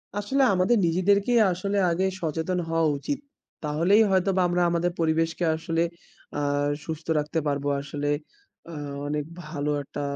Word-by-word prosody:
আসলে 235 +7 0
আমাদের 185 +6 +3
নিজেদেরকেই 200 +7 +3
আসলে 200 +3 -2
আগে 185 +3 +1 0.2
সচেতন 165 +3 -1
হওয়া 165 0 +2
উচিত। 280 - -3 0.4
তাহলেই 170 +8 +3
হয়তোবা 190 0 +2
আমরা 175 0 +1
আমাদের 175 +1 +1
পরিবেশকে 165 +1 +1
আসলে 165 +1 -1 0.6
আ - - 0 0.5
সুস্থ 160 0 -5
রাখতে 150 +2 -1
পারবো। 145 0 -1
আসলে 145 +1 -4 0.6
আ - - -8 0.3
অনেক 150 0 -1 0.2
ভালো 150 -2 -3
একটা 145 - -6
165 Hz, 135 wpm, -26 LUFS, 155-190 Hz, 0.6 s, আমাদের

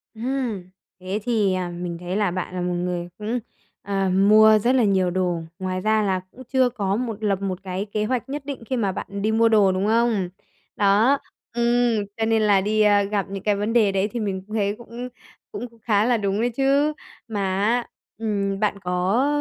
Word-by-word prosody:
Ừm, 230 -6 -3 0.3
thế 185 +3 -3
thì, 215 -5 +1
à, 185 -1 -2
mình 175 0 -5
thấy 180 +1 -4
là 205 -4 +1
bạn 185 0 -4
là 180 - -2
một 180 0 -1
người 175 0 -2
cũng, 220 +4 -2 0.4
ờ, 195 -1 -1
mua 215 +3 +6
rất 245 +5 +2
là 255 - +4
nhiều 190 -3 +2
đồ, 180 -2 0 0.2
ngoài 185 0 -2
ra 215 +1 +2
là 190 -2 +1
cũng 260 - -12
chưa 260 -1 +4
có 200 -5 -1
một 225 -2 -4
lập 200 -2 0
một 190 -2 -3
cái 190 +1 -3
kế 210 0 -2
hoạch 255 +2 -2
nhất 285 0 -5
định 275 -4 -6
khi 260 +2 -2
mà 205 -5 +1
bạn - - -6
đi 215 +2 +1
mua 230 +1 +4
đồ, 210 -3 +5
đúng 185 +1 -1
không? 225 -5 +2 0.5
Đó, 215 +6 +4 0.4
ừm, 235 -2 +2
cho 225 - 0
nên 225 0 +2
là 205 -2 +4
đi 215 +2 +1
a, 205 -1 +5
gặp 200 -1 -1
những 195 0 -6
cái 210 -1 +2
vấn 205 +3 -2
đề 220 -4 +4
đấy 195 +1 +1
thì 240 - -3
mình 195 -3 -3
cũng 215 - -6
thấy 205 -1 0
cũng 235 +1 -8 0.4
cũng 245 - -8
khá 210 -2 +2
là 240 0 +3
đúng 200 -1 -1
đấy 240 - +2
chứ. 275 +4 +2 0.3
Mà 210 -3 -3 0.2
á, 235 +3 +1 0.3
ừm, 200 -3 -1
bạn 205 -1 0
có, 185 +7 +1
210 Hz, 215 wpm, -23 LUFS, 190-230 Hz, 0.5 s, mua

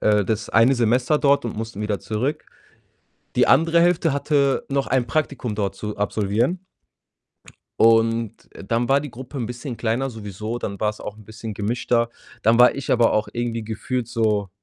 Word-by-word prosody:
äh, 105 -2 +3
das 110 +1 -2
eine 115 +5 +4
Semester 125 +5 +2
dort 140 -2 +3
und 115 - -4
mussten 110 -2 -5
wieder 105 -1 -1
zurück. 130 +8 -3 0.9
Die - - +4
andere 165 +4 +4
Hälfte 170 -3 +2
hatte 140 -1 +1
noch 140 0 0
ein 125 -1 0
Praktikum 130 -5 -2
dort 100 -2 -1
zu 105 +2 -6
absolvieren 110 - 0 1.2
und 115 -1 +3 0.2
dann 115 +5 -2
war 140 +1 +5
die 145 -1 -6
Gruppe 130 +3 -9
'n 120 - -2
bisschen 125 +1 -6
kleiner 120 +4 -1
sowieso, 110 +1 -6
dann 100 -1 -5
war's 105 0 -1
auch 105 - -7
'n 110 - -15
bisschen 110 +1 -8
gemischter. 115 +3 0 0.3
Dann 115 +2 +3
war 125 - +7
ich 140 -1 -3
aber 120 -2 +4
auch 110 0 0
irgendwie 120 -1 -3
gefühlt 115 +2 -3
so 105 -4 0
115 Hz, 170 wpm, -22 LUFS, 110-130 Hz, 1.2 s, war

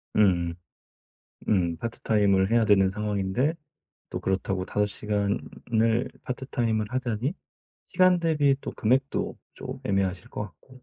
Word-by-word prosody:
음음. 90 -5 +3 0.9
음. 85 -5 +2
파트타임을 100 -2 +1
해야 115 -1 +4
되는 100 -3 +5
상황인데 105 - 0 0.6
또 - - -4
그렇다고 95 0 -1
5 105 +2 0
시간을 110 +3 -1
파트타임을 120 -4 -1
하자니 125 - -1 0.5
시간 185 -1 +4
대비 150 -4 +3
또 - - -5
금액도 130 +5 0 0.2
좀 - - -7
애매하실 95 -2 0
것 - - -4
같고. 130 +5 -13
105 Hz, 265 characters per minute, -27 LUFS, 95-125 Hz, 0.9 s, 되는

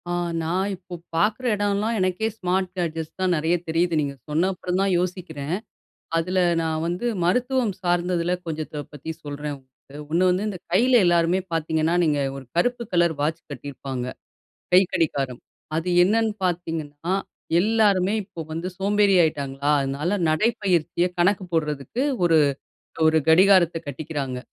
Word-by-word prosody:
ஆ. - - -1 0.3
நான் 185 +5 0
இப்போ, 180 0 -13 0.2
பாக்குற 215 +9 +1
இடயெல்லாம், 205 +2 0
எனக்கே 185 +3 0
ஸ்மார்ட் 185 -1 0
கேட்ஜெட்ஸ் 165 -2 -3
தான் 185 -1 +2
நெறைய 160 +2 +1
தெரியுது. 165 +2 +1
நீங்க, 140 -1 -2 0.2
சொன்ன 160 +5 +2
அப்பறம் 180 0 -2
தான் 195 0 +2
யோசிக்கிறன். 175 -4 -3 0.6
அதில, 180 +3 -1 0.2
நான் 160 -1 -1
வந்து 175 +7 -2 0.2
மருத்துவம் 250 +3 +1
சார்ந்ததில 175 0 +1
கொஞ்சத்த 155 -2 -4
பத்தி 150 +2 -7
சொல்றன், 145 0 -5
உங்களுக்கு. 135 +2 -15
ஒண்ணு 180 +3 +3
வந்து, 185 +4 0
இந்த 195 -3 -5
கைல 240 +8 +4
எல்லாருமே 175 +1 +3
பாத்தீங்கன்னா, 160 +1 +1
நீங்க 150 -3 +2 0.2
ஒரு 135 - -8
கருப்பு 245 +7 +1
கலர் 170 -2 +3
வாட்ச் 160 +3 -1
கட்டியிருப்பாங்க. 135 -2 -5 0.7
கைக்கடிகாரம்! 160 -9 +2 0.4
அது, 165 +3 -2 0.2
என்னென்னு 220 +2 +2
பாத்தீங்கன்னா, 165 -2 -2 0.5
எல்லாருமே 205 -2 +3
இப்போ 185 -4 -10
வந்து 165 +3 -3
சோம்பேறி 200 0 +3
ஆகிட்டாங்களா, 140 -3 -1
அதனால 145 +8 -1
நடைப்பயிற்சிய 180 -2 +1
கணக்கு 185 +2 +2
போடுறதுக்கு 150 - -1 0.2
ஒரு 165 -2 +5 0.7
ஒரு 160 0 +4
கடிகாரத்த 180 0 +6
கட்டிக்கிறாங்க. 140 -2 -4
175 Hz, 130 wpm, -24 LUFS, 155-190 Hz, 0.7 s, கடிகாரத்த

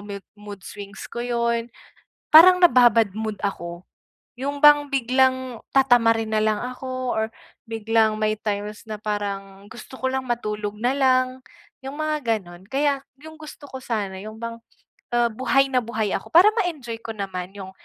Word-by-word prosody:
mood 200 -1 -7
mood 205 -2 -10
swings 205 0 -9
ko - - -7
yun. 235 -1 0 0.7
Parang 360 +3 +9
nababa-bad 240 - +5
mood 220 -1 -4
ako. 175 -3 -4 0.6
Yung 285 +2 -3
bang 290 -1 +7
biglang 260 -1 +1 0.2
tatamarin 230 -4 +4
na 215 - +2
lang 215 -1 +1
ako, 255 0 -4
or 220 - +1 0.4
biglang 225 -1 +1
may 215 0 +1
times 210 0 -4
na 215 - -3
parang 200 -2 -4
gusto 260 - -11
ko 260 - -1
lang 265 0 -2
matulog 210 -3 -3
na 245 +3 +1
lang, 255 -1 +2 0.4
yung 270 +2 -6
mga 300 -8 0
ganun. 175 -1 -14
Kaya 280 +1 0 0.2
'yong 315 +1 -11
gusto 300 -2 -11
ko 265 - -7
sana 205 -6 -3
yung 215 +2 -9
bang, 230 0 -5 0.6
ah, 240 0 +3
buhay 270 +4 +2
na 250 -2 +2
buhay 220 -3 -2
ako - - -6
para 365 +6 +7
ma-enjoy 275 - -3
ko 225 - -5
naman 190 -3 -5
'yong 190 -1 -8
230 Hz, 160 wpm, -23 LUFS, 210-260 Hz, 0.7 s, Parang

